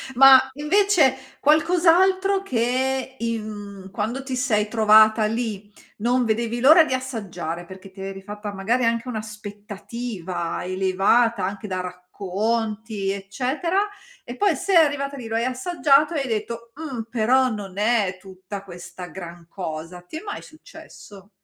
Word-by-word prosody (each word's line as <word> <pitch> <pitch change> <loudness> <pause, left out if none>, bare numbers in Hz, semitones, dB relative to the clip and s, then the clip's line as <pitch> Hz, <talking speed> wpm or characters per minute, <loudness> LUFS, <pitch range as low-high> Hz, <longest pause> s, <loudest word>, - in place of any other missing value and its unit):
Ma 270 +1 +9
invece 300 -3 +2
qualcos'altro 360 +5 +3
che 260 -3 -1
in 210 -4 -5
quando 220 +7 -3
ti 265 -1 -4
sei 225 -5 +1
trovata 220 0 +5
lì 215 -2 -3 0.3
non 245 +3 +1
vedevi 230 +1 -1
l'ora 315 +7 +8
di 265 - -2
assaggiare 195 - -4
perché 190 +2 -12
ti 190 0 -11
eri 195 0 -6
fatta 205 +1 -7
magari 230 +6 0
anche 230 +2 0
un'aspettativa 210 -4 -6
elevata 195 +5 +2
anche 200 +2 -5
da 185 -2 -2
racconti 200 +3 -3
eccetera. 255 - -2 0.5
E 240 - -8
poi 400 -6 +2
sei 365 +6 +2
arrivata 285 -3 +2
lì, 240 -4 -7
lo 225 - -3
hai 230 +1 +1
assaggiato 285 +3 +2
e 290 - 0
hai 270 - -3
detto: 230 +1 -4
"Mh, 285 -6 -5
però, 250 +3 +3
non 200 -4 -6
è 210 -3 +1
tutta 190 +1 -9
questa 180 -1 -9
gran 170 0 -10
cosa." 170 -1 -6
Ti 180 - -9
è - - -7
mai 410 - -6
successo? 205 - -14
225 Hz, 140 wpm, -23 LUFS, 195-265 Hz, 0.5 s, Ma